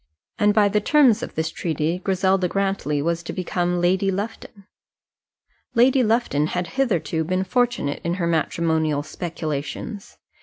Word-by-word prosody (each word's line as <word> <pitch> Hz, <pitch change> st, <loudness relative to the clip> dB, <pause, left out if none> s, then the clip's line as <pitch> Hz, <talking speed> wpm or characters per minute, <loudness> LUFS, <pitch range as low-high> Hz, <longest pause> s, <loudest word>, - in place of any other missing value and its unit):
And 210 Hz, -1 st, +4 dB
by 205 Hz, -1 st, +4 dB
the 210 Hz, +1 st, +1 dB
terms 265 Hz, -3 st, +4 dB
of -, -, -6 dB
this 160 Hz, 0 st, -1 dB
treaty 165 Hz, +1 st, -2 dB
Griselda 190 Hz, 0 st, +1 dB
Grantly 195 Hz, -7 st, -1 dB
was 170 Hz, +1 st, 0 dB
to 170 Hz, -, -6 dB
become 180 Hz, -1 st, -1 dB
Lady 185 Hz, +3 st, +2 dB
Lufton. 200 Hz, 0 st, -5 dB, 1.1 s
Lady 255 Hz, +3 st, +5 dB
Lufton 220 Hz, -10 st, +1 dB
had 180 Hz, +2 st, -2 dB
hitherto 190 Hz, -, 0 dB
been 185 Hz, +3 st, -1 dB
fortunate 240 Hz, -, 0 dB
in 170 Hz, +1 st, -1 dB
her 180 Hz, -2 st, -1 dB
matrimonial 160 Hz, -2 st, 0 dB
speculations. 165 Hz, +6 st, -5 dB
180 Hz, 140 wpm, -23 LUFS, 165-205 Hz, 1.1 s, Lady